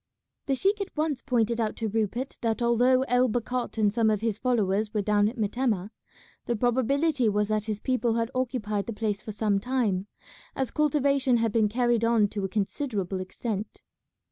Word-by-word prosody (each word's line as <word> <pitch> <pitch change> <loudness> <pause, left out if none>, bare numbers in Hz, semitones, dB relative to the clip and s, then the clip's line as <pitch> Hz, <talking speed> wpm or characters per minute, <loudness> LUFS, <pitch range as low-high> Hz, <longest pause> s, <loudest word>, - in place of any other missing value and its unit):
The 275 - +2
sheik 400 +9 +1
at 390 -5 -6
once 300 -4 0
pointed 235 -3 +1
out 215 -1 -1
to 225 - -2
Rupert 225 +4 -2
that 225 -2 0
although 245 +2 +3
El 250 -1 +2
Bakhat 245 +2 -2
and 210 -2 +2
some 225 -1 +3
of 215 -1 0
his 225 -2 -1
followers 215 -4 +1
were 210 - +1
down 205 0 +3
at 245 - -10
Metemmeh, 215 -2 -1 0.6
the 240 - +1
probability 255 +3 +2
was 210 0 0
that 215 -1 0
his 215 -2 -3
people 245 -1 0
had 230 +1 -1
occupied 230 -6 -2
the 230 - -3
place 210 -2 -2
for 215 - -6
some 210 -1 +1
time, 210 -5 -1 0.5
as 265 -2 -2
cultivation 280 -4 +2
had 225 -1 +1
been 215 -1 +2
carried 240 0 +1
on 230 -2 +4
to 205 -1 -4
a 195 - -1
considerable 200 - -2
extent. 205 +2 -5
230 Hz, 185 wpm, -27 LUFS, 210-255 Hz, 0.6 s, on